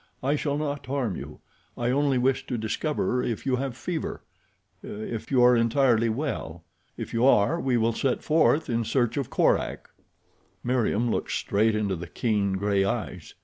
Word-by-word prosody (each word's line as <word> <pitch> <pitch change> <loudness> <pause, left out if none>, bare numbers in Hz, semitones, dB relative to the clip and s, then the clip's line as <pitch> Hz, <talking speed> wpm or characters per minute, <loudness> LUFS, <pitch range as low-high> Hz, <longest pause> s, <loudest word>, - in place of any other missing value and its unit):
"I 140 +3 +2
shall 145 -1 -1
not 145 -2 -3
harm 130 -8 -1
you. - - -9 0.4
I 120 0 0
only 140 0 +2
wish 130 +1 +1
to 125 - -2
discover 125 +3 -1
if 115 0 -3
you 130 -2 +1
have 130 -2 -4
fever—if 120 -7 -7
you 125 -2 +4
are 125 0 +6
entirely 115 0 +3
well. 110 - -4 0.3
If - - -6
you 115 +1 +1
are 135 +5 +4
we 130 -6 +1
will 115 0 +1
set 130 +2 -1
forth 160 0 +3
in 115 -2 0
search 120 0 0
of 140 -4 -2
Korak." - - 0 0.7
Meriem 120 -2 +1
looked - - -2
straight 110 +2 +1
into 105 -3 0
the 85 0 -7
keen 100 0 0
gray 100 0 +1
eyes. 100 - -4
120 Hz, 165 wpm, -26 LUFS, 110-135 Hz, 0.7 s, are